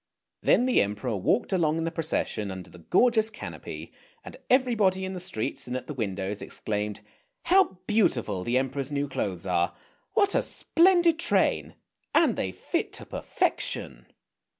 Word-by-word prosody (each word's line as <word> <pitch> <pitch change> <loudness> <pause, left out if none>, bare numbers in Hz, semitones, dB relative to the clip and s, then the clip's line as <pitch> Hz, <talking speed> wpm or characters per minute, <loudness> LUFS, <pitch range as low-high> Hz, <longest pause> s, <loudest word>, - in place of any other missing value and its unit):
Then 245 - +4
the 255 - +4
Emperor 105 +4 -2
walked 195 - +1
along 160 -4 +2
in 165 - -1
the 165 - -1
procession 155 - -2
under 95 -1 -8
the 90 - -13
gorgeous 220 - +3
canopy, 220 - -8 0.3
and - - -9
everybody 220 -8 +3
in 190 - -4
the 185 - -5
streets 150 -13 -3
and 125 +1 -2
at - - -7
the 150 - -6
windows 100 -4 -3
exclaimed, 105 0 -3 0.4
"How 375 - +4
beautiful 120 - +1
the 120 +4 +1
Emperor's 135 +1 -1
new 145 0 -1
clothes 95 -8 -3
are! 90 -1 +1 0.4
What 405 -1 +3
a - - +3
splendid 345 -1 +4
train! 340 +1 +1 0.4
And 300 -9 +4
they 95 - -2
fit - - -3
to - - -7
perfection! - - -2
150 Hz, 155 wpm, -27 LUFS, -, 0.4 s, Then